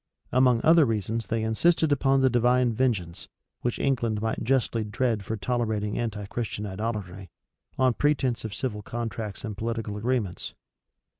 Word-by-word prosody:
Among 125 Hz, -2 st, +4 dB
other 165 Hz, 0 st, +7 dB
reasons, 115 Hz, -1 st, -1 dB
they 115 Hz, -1 st, -1 dB
insisted 160 Hz, +8 st, +2 dB
upon 135 Hz, -1 st, +3 dB
the 130 Hz, -, +5 dB
divine 125 Hz, 0 st, +3 dB
vengeance, 105 Hz, -9 st, -1 dB, 0.3 s
which 120 Hz, -, -1 dB
England 120 Hz, -6 st, 0 dB
might 110 Hz, +1 st, -2 dB
justly 120 Hz, -2 st, +1 dB
dread 110 Hz, 0 st, -1 dB
for 110 Hz, +3 st, -3 dB
tolerating 110 Hz, -3 st, -1 dB
anti 110 Hz, -3 st, -3 dB
Christian 105 Hz, 0 st, -4 dB
idolatry, 100 Hz, -2 st, -4 dB, 0.5 s
on 130 Hz, -2 st, +3 dB
pretence 130 Hz, -5 st, +1 dB
of 110 Hz, -3 st, -5 dB
civil 105 Hz, -6 st, -3 dB
contracts 115 Hz, -1 st, -5 dB
and 105 Hz, -2 st, -5 dB
political 115 Hz, -1 st, -3 dB
agreements. 110 Hz, -5 st, -2 dB
115 Hz, 145 wpm, -26 LUFS, 105-125 Hz, 0.5 s, other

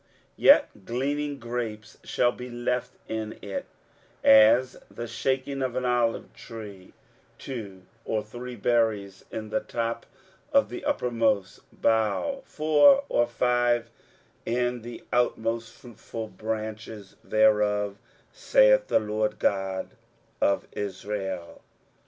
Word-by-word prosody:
23:017:006 -, -, -37 dB, 0.3 s
Yet 100 Hz, -, +5 dB
gleaning 145 Hz, +4 st, -2 dB
grapes 115 Hz, -2 st, -5 dB
shall 120 Hz, -, +2 dB
be 125 Hz, +1 st, -8 dB
left 120 Hz, +1 st, -2 dB
in 110 Hz, -1 st, -4 dB
it, 100 Hz, -, -5 dB, 0.6 s
as 115 Hz, +4 st, +6 dB
the 120 Hz, -, -6 dB
shaking 135 Hz, +4 st, -2 dB
of 130 Hz, -2 st, -2 dB
an 130 Hz, -, -1 dB
olive 120 Hz, -2 st, 0 dB
tree, 105 Hz, -5 st, -10 dB, 0.4 s
two 100 Hz, -8 st, -7 dB, 0.2 s
or 110 Hz, -2 st, -1 dB
three 120 Hz, +3 st, -8 dB
berries 110 Hz, -3 st, 0 dB
in 110 Hz, -1 st, -6 dB
the -, -, +1 dB
top 115 Hz, 0 st, -3 dB, 0.4 s
of 280 Hz, -1 st, +4 dB
the -, -, -7 dB
uppermost 115 Hz, -, 0 dB
bough, 115 Hz, -, 0 dB
four 155 Hz, -, +5 dB
or 120 Hz, 0 st, +2 dB
five 120 Hz, -1 st, +1 dB, 0.5 s
in 120 Hz, 0 st, -1 dB
the 120 Hz, +1 st, -9 dB
outmost 115 Hz, -1 st, 0 dB
fruitful 115 Hz, -2 st, -8 dB
branches 110 Hz, -2 st, -6 dB
thereof, 105 Hz, -2 st, +2 dB, 0.3 s
saith -, -, +4 dB
the -, -, +3 dB
LORD 105 Hz, 0 st, -1 dB
God 95 Hz, -1 st, -1 dB, 0.5 s
of 100 Hz, -, +2 dB
Israel. 95 Hz, -2 st, -5 dB
115 Hz, 115 wpm, -26 LUFS, 105-125 Hz, 0.6 s, as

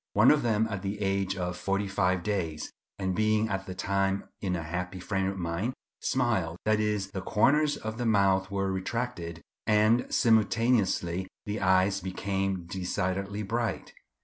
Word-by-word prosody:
One 105 Hz, +5 st, +6 dB
of 150 Hz, -, +3 dB
them 110 Hz, -2 st, +2 dB
at 100 Hz, -4 st, -4 dB
the 100 Hz, +1 st, -3 dB
age 95 Hz, -1 st, 0 dB
of 90 Hz, -1 st, -2 dB
forty 100 Hz, +2 st, 0 dB
five 95 Hz, -2 st, +1 dB
days, 85 Hz, -7 st, -2 dB, 0.3 s
and 95 Hz, -1 st, -1 dB
being 110 Hz, 0 st, +2 dB
at 95 Hz, -1 st, -3 dB
the 95 Hz, -, -5 dB
time 95 Hz, 0 st, 0 dB, 0.2 s
in 95 Hz, -3 st, -1 dB
a 85 Hz, -, -3 dB
happy 90 Hz, +3 st, -4 dB
frame 95 Hz, +1 st, -1 dB
of 95 Hz, 0 st, -3 dB
mind, 90 Hz, +8 st, -2 dB, 0.2 s
smiled; 110 Hz, -10 st, 0 dB
that 110 Hz, 0 st, +3 dB
is, 105 Hz, -2 st, -1 dB
the 95 Hz, -, -4 dB
corners 145 Hz, +10 st, +3 dB
of 110 Hz, +1 st, -5 dB
the 120 Hz, -, -1 dB
mouth 95 Hz, -3 st, +3 dB
were 95 Hz, -1 st, -1 dB
retracted, 95 Hz, -4 st, -3 dB, 0.2 s
and 110 Hz, +2 st, +3 dB
simultaneously 110 Hz, -5 st, +2 dB, 0.2 s
the 105 Hz, +1 st, -3 dB
eyes 95 Hz, +1 st, +3 dB
became 95 Hz, -1 st, -2 dB
decidedly 95 Hz, +2 st, -2 dB
bright. 115 Hz, 0 st, -2 dB
100 Hz, 160 wpm, -29 LUFS, 95-110 Hz, 0.3 s, One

